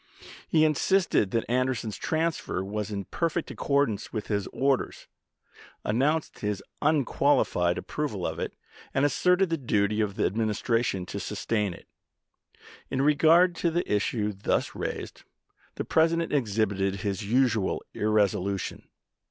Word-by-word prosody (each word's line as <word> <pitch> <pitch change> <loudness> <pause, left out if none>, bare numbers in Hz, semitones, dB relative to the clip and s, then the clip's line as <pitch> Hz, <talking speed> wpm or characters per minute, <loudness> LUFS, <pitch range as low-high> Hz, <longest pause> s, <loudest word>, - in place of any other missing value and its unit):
He 155 -1 +4
insisted 155 - +2
that 115 +3 -1
Anderson's 125 -3 0
transfer 160 - -1
was 105 +1 -3
in 100 -2 -4
perfect 165 -1 -2
accordance 140 -8 0
with 110 -3 -5
his 100 -2 -1
orders, 135 -1 -1 0.8
announced 145 +9 0
his 105 -2 -2 0.2
unqual 145 -1 +3
ified 90 0 0
approval - - -3
of - - -3
it, - - -4 0.4
and 135 +2 +3
asserted 180 +6 +2
the 165 - +1
duty 105 -4 +1
of 100 -2 -1
the - - +1
Administration 110 -1 0
to 100 - -5
sustain 105 -2 -2
it. - - -16 1.0
In 135 +1 0
regard 165 +4 +5
to 170 - +1
the 175 +2 -1
issue 105 0 0
thus 100 - -1
raised, - - -5 0.5
the - - -4
President 165 0 +2
exhibited 100 -6 0
his 100 0 -2
usual 115 -2 +1
irresolution. 100 -2 0
115 Hz, 130 wpm, -27 LUFS, 100-150 Hz, 1.0 s, regard